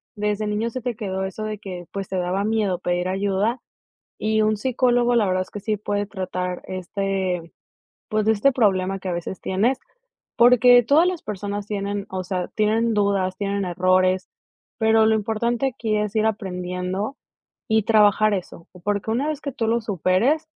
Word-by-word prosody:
desde 210 Hz, 0 st, -1 dB
niño 215 Hz, +3 st, -1 dB
se 255 Hz, -, -5 dB
te 240 Hz, -1 st, -3 dB
quedó 190 Hz, -2 st, -3 dB
eso 190 Hz, +3 st, -5 dB
de 215 Hz, -1 st, -4 dB
que, 185 Hz, -4 st, -7 dB
pues, 195 Hz, -1 st, -5 dB
te 190 Hz, -, -2 dB
daba 180 Hz, +2 st, 0 dB
miedo 210 Hz, -5 st, 0 dB
pedir 180 Hz, 0 st, -1 dB
ayuda, 200 Hz, +5 st, 0 dB, 0.6 s
y 220 Hz, 0 st, +1 dB
un 215 Hz, 0 st, +2 dB
psicólogo, 245 Hz, +1 st, +2 dB
la 220 Hz, -4 st, +3 dB
verdad 185 Hz, 0 st, +1 dB
es -, -, -19 dB
que 205 Hz, -, -6 dB
sí 215 Hz, +1 st, -1 dB
puede 205 Hz, 0 st, -2 dB
tratar, 185 Hz, -2 st, -4 dB
este, 185 Hz, -2 st, -3 dB, 0.6 s
pues 215 Hz, 0 st, 0 dB
este 220 Hz, +5 st, +4 dB
problema 195 Hz, -5 st, +1 dB
que 185 Hz, -, -5 dB
a -, -, -1 dB
veces 175 Hz, +2 st, -5 dB
tienes, 225 Hz, +8 st, +1 dB, 0.6 s
porque 245 Hz, 0 st, +7 dB
todas 300 Hz, +9 st, +4 dB
las 365 Hz, -3 st, -2 dB
personas 205 Hz, 0 st, -4 dB
tienen, 200 Hz, -1 st, -3 dB
o 185 Hz, -1 st, -3 dB
sea, 180 Hz, -1 st, -3 dB
tienen 220 Hz, +2 st, +2 dB
dudas, 200 Hz, -3 st, +1 dB
tienen 200 Hz, 0 st, -1 dB
errores, 185 Hz, +1 st, +2 dB, 0.5 s
pero 220 Hz, 0 st, +4 dB
lo 220 Hz, -, +4 dB
importante 225 Hz, +4 st, 0 dB
aquí 220 Hz, -2 st, -1 dB
es 210 Hz, 0 st, -2 dB
ir 215 Hz, 0 st, +2 dB
aprendiendo 185 Hz, +2 st, -3 dB, 0.5 s
y 220 Hz, -2 st, +2 dB
trabajar 215 Hz, -1 st, +4 dB
eso, 175 Hz, -2 st, -7 dB, 0.2 s
porque 205 Hz, +2 st, -1 dB
una 255 Hz, +6 st, 0 dB
vez 300 Hz, -2 st, -4 dB
que 280 Hz, -, -4 dB
tú 235 Hz, -3 st, -2 dB
lo 235 Hz, +1 st, +1 dB
superes 215 Hz, -, +1 dB
205 Hz, 175 wpm, -23 LUFS, 190-220 Hz, 0.6 s, porque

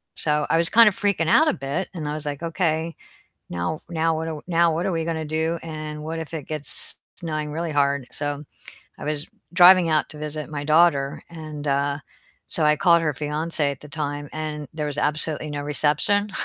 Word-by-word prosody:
so 150 Hz, -1 st, 0 dB
I 165 Hz, -, +3 dB
was 165 Hz, 0 st, +3 dB
kind 230 Hz, -1 st, +8 dB
of 190 Hz, -, -7 dB
freaking 200 Hz, -5 st, +1 dB
out 315 Hz, -, +6 dB
a 305 Hz, -, +3 dB
bit, 140 Hz, +8 st, -3 dB
and 155 Hz, -4 st, -5 dB
I 150 Hz, -, -2 dB
was 155 Hz, -, -5 dB
like, 145 Hz, +2 st, -4 dB
"Okay, 165 Hz, -1 st, -1 dB, 0.6 s
now 85 Hz, -, -2 dB
now 165 Hz, -1 st, +1 dB
what 160 Hz, -, -3 dB
do -, -, -4 dB
w 150 Hz, -2 st, -6 dB
now 170 Hz, -1 st, +3 dB
what 170 Hz, -, -1 dB
are 190 Hz, -, 0 dB
we 165 Hz, -1 st, -1 dB
gonna 160 Hz, -1 st, -2 dB
do, 160 Hz, +2 st, -1 dB
and 155 Hz, -2 st, -6 dB
what 165 Hz, +1 st, -4 dB
if 160 Hz, 0 st, -6 dB
it 150 Hz, -4 st, -6 dB
gets 155 Hz, -2 st, -5 dB, 0.2 s
snowing 155 Hz, -3 st, -4 dB
really 165 Hz, 0 st, -3 dB
hard?" 140 Hz, -2 st, +1 dB
so, 145 Hz, 0 st, -3 dB, 0.6 s
I -, -, -7 dB
was 150 Hz, 0 st, -1 dB, 0.3 s
driving 180 Hz, -1 st, +8 dB
out 155 Hz, -1 st, +2 dB
to 150 Hz, -, -10 dB
visit 150 Hz, 0 st, -5 dB
my 145 Hz, -1 st, -4 dB
daughter, 155 Hz, -3 st, +3 dB
and, 155 Hz, -3 st, -7 dB
uh, 140 Hz, +1 st, +1 dB, 0.5 s
so 160 Hz, -, +1 dB
I 150 Hz, -, +5 dB
called 170 Hz, -2 st, +4 dB
her 150 Hz, -3 st, 0 dB
fiancé 150 Hz, +1 st, -1 dB
at 135 Hz, -, -8 dB
the 150 Hz, -, -11 dB
time, 145 Hz, -1 st, -4 dB
and 155 Hz, -2 st, -4 dB
there 150 Hz, -1 st, -3 dB
was 145 Hz, -, -3 dB
absolutely 150 Hz, 0 st, 0 dB
no 145 Hz, -1 st, -4 dB
reception. 150 Hz, +8 st, +2 dB
155 Hz, 210 wpm, -23 LUFS, 150-165 Hz, 0.6 s, kind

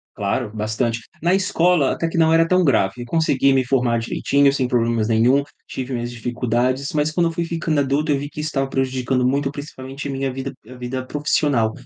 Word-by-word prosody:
Claro, 105 Hz, +3 st, -1 dB
bastante. 110 Hz, +2 st, -1 dB, 0.2 s
Na 170 Hz, +2 st, +3 dB
escola 180 Hz, -6 st, +2 dB
até 165 Hz, -, -2 dB
que 170 Hz, -, -3 dB
não 160 Hz, 0 st, +4 dB
era 165 Hz, 0 st, +5 dB
tão 185 Hz, +1 st, +3 dB
grave, 110 Hz, -4 st, +1 dB
eu -, -, -7 dB
consegui 140 Hz, -3 st, +2 dB
me 130 Hz, -1 st, +2 dB
formar 125 Hz, -3 st, +1 dB
direitinho, 140 Hz, +4 st, +2 dB
sem 130 Hz, -2 st, 0 dB
problemas 115 Hz, -3 st, +1 dB
nenhum, 120 Hz, +5 st, +3 dB, 0.2 s
tive 130 Hz, 0 st, -5 dB
minhas 120 Hz, 0 st, -3 dB
dificuldades, 125 Hz, +3 st, -1 dB
mas 150 Hz, 0 st, 0 dB
quando 170 Hz, 0 st, +2 dB
eu -, -, -4 dB
fui 170 Hz, +1 st, -2 dB
ficando 165 Hz, -2 st, -1 dB
adulto, 140 Hz, +3 st, 0 dB
eu 140 Hz, -, +2 dB
vi 145 Hz, +1 st, -5 dB
que 150 Hz, -, -8 dB
isso 155 Hz, -, -2 dB
estava 135 Hz, -2 st, -1 dB
prejudicando 130 Hz, -1 st, 0 dB
muito, 140 Hz, +2 st, 0 dB
principalmente 140 Hz, -1 st, -7 dB
a -, -, -3 dB
minha 135 Hz, -1 st, -2 dB
vida 135 Hz, +1 st, -5 dB, 0.2 s
a 130 Hz, -, -10 dB
vida 130 Hz, +1 st, -5 dB
profissional, 145 Hz, -6 st, +1 dB
135 Hz, 210 wpm, -21 LUFS, 120-150 Hz, 0.2 s, era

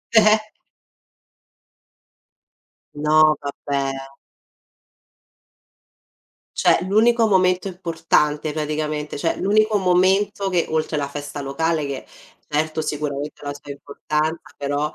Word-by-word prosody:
Eh-eh. 215 Hz, 0 st, +5 dB, 2.4 s
No, 155 Hz, +1 st, +4 dB
vabbè! 140 Hz, -1 st, -2 dB, 2.7 s
Cioè, -, -, +4 dB
l'unico 225 Hz, +3 st, +4 dB
momento 185 Hz, -2 st, +2 dB
importante, 165 Hz, -4 st, 0 dB
praticamente, 150 Hz, 0 st, -3 dB
cioè, 165 Hz, +3 st, -1 dB
l'unico 215 Hz, +2 st, +2 dB
momento 195 Hz, +2 st, +2 dB
che, 175 Hz, -2 st, +1 dB
oltre 155 Hz, -1 st, -1 dB
la 140 Hz, -1 st, -1 dB
festa 145 Hz, 0 st, -6 dB
locale 155 Hz, +3 st, -1 dB
che, 140 Hz, -1 st, -5 dB, 0.4 s
certo, 155 Hz, +1 st, -1 dB
sicuramente 150 Hz, -1 st, -4 dB
ha 145 Hz, -, -6 dB
la 145 Hz, -, -3 dB
sua 145 Hz, 0 st, -10 dB
importanza, 150 Hz, +3 st, -3 dB, 0.2 s
però, 145 Hz, +2 st, -1 dB
155 Hz, 95 wpm, -21 LUFS, 145-185 Hz, 2.7 s, Eh-eh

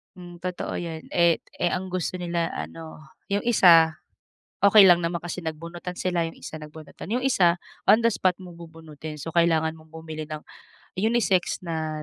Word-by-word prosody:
Hmm, 175 Hz, -1 st, -11 dB
totoo 180 Hz, 0 st, -4 dB
yan. 165 Hz, -2 st, -6 dB
Eh 170 Hz, -1 st, +3 dB, 0.2 s
eh, 175 Hz, -, +2 dB
ang 185 Hz, 0 st, -5 dB
gusto 185 Hz, 0 st, -2 dB
nila 170 Hz, -2 st, -2 dB
ano, 160 Hz, -1 st, -8 dB, 0.2 s
yung 200 Hz, 0 st, -1 dB
isa, 165 Hz, -9 st, +5 dB, 0.6 s
okey 200 Hz, -1 st, +8 dB
lang 175 Hz, -1 st, +6 dB
naman 170 Hz, 0 st, -1 dB
kasi 175 Hz, +1 st, -5 dB
nagbunutan 170 Hz, +3 st, -6 dB
sila, 180 Hz, -2 st, 0 dB
yung 165 Hz, -, -10 dB
isa -, -, -8 dB
nagbunutan. 155 Hz, +1 st, -11 dB
Yung 250 Hz, +2 st, 0 dB
isa, 180 Hz, -10 st, +3 dB, 0.3 s
on 220 Hz, -, +7 dB
the -, -, +5 dB
spot 185 Hz, -3 st, +1 dB
mo 180 Hz, -2 st, -11 dB
bubunutin. 160 Hz, -2 st, -10 dB
So, 165 Hz, -, -6 dB
kailangan 160 Hz, -1 st, +2 dB
mong 160 Hz, 0 st, -20 dB
bumili 160 Hz, -1 st, -7 dB
ng 155 Hz, 0 st, -6 dB, 0.6 s
unisex 210 Hz, -5 st, +1 dB
na 155 Hz, -2 st, -3 dB
170 Hz, 170 wpm, -25 LUFS, 160-180 Hz, 0.6 s, okey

